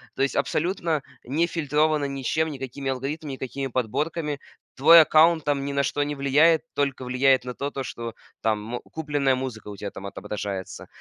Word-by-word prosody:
То - - +1
есть 140 - 0
абсолютно 160 +1 0 0.2
не 150 +7 +1
фильтровано 150 -2 +1
ничем: 140 +4 -1
никакими 135 -1 -5
алгоритмами, 140 +3 -3
никакими 135 +1 -4
подборками. 145 +5 -2 0.4
Твой 165 +5 +9
аккаунт 160 +1 +5
там 140 -2 0
ни 140 - -3
на 140 0 +1
что 145 +2 -1
не 145 0 -1
влияет, 150 +4 +4
только 140 -2 -1
влияет 130 +1 +3
на 125 0 -5
то, 140 +3 -4
то 135 -1 -4
что 115 -2 -6 0.3
там 110 -2 +1
мо 120 +3 -4
купленная 145 -4 -1
музыка 130 -5 -5
у 105 - -6
тебя 100 0 -6
там 100 - -9
отображается. 100 -1 -5
140 Hz, 175 wpm, -25 LUFS, 130-150 Hz, 0.4 s, Твой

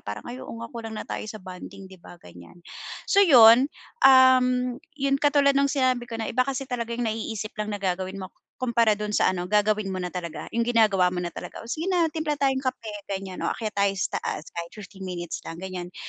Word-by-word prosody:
parang, 105 0 -6
"Ay, 250 +2 -7
oo - - -8
nga, 230 +1 -8
kulang 225 -2 -6
na - - -5
tayo - - -5
sa 215 - -6
bonding." 185 +1 -10
'Di 190 -2 -15
ba? 175 - -13
Ganyan. 90 - -15 0.4
So 400 - +4
yun, 250 - +8 0.4
um, 255 -1 +5 0.2
yun 275 0 0
katulad 285 -1 +4
no'ng 280 0 +2
sinabi 255 -3 0
ko 230 - -5
na 225 - -4
iba 255 +3 +1
kasi 270 0 -2
talaga 235 -2 -4
yung 245 - -2
naiisip 220 -1 -3
lang 210 - -3
na 205 - -2
gagawin 190 0 -2
mo 185 - -8 0.3
kumpara 230 -4 +2
do'n 210 0 -3
sa - - +3
ano, 180 -1 -3
gagawin 210 +1 +2
mo 185 -1 -3
na 180 - -3
talaga. 175 -3 -6
Yung 230 0 0
ginagawa 200 -6 +3
mo 180 - -2
na 175 - -3
talaga, - - -8
"Oh, 230 - -10
sige 320 +7 -3
na 345 -4 +2
timpla 310 -1 -2
tayong 270 -2 +1
kape," 255 -4 -4 0.2
ganyan, 190 -2 -5
"Oh, - - -1
akyat 220 -1 -4
tayo 200 0 +2
sa 195 - -2
taas 155 - -5
kahit 170 0 -7
15 195 -2 -10
minutes 175 -2 -5
lang." 165 +2 -7
Ganyan. 180 -1 -6
220 Hz, 225 wpm, -25 LUFS, 185-255 Hz, 0.4 s, yun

